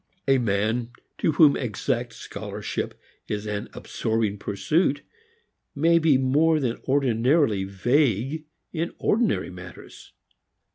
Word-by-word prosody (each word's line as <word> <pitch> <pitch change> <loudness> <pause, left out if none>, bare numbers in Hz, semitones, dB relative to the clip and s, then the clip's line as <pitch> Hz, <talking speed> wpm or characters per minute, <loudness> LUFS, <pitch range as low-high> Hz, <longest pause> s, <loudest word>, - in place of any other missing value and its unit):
A 135 -1 +4
man 110 +2 0 0.3
to 160 - +2
whom 150 -1 +6
exact 120 0 -2
scholarship - - -5 0.3
is 105 0 -3
an 105 -1 -4
absorbing 110 -2 -2
pursuit 145 - 0 0.7
may 165 +3 +4
be 155 -4 +4
more 150 +5 +3
than 125 -5 -2
ordinarily 130 -4 +2
vague 125 - +1 0.3
in 170 +1 -2
ordinary 225 - +1
matters. 90 0 -12
130 Hz, 105 wpm, -25 LUFS, 105-150 Hz, 0.7 s, whom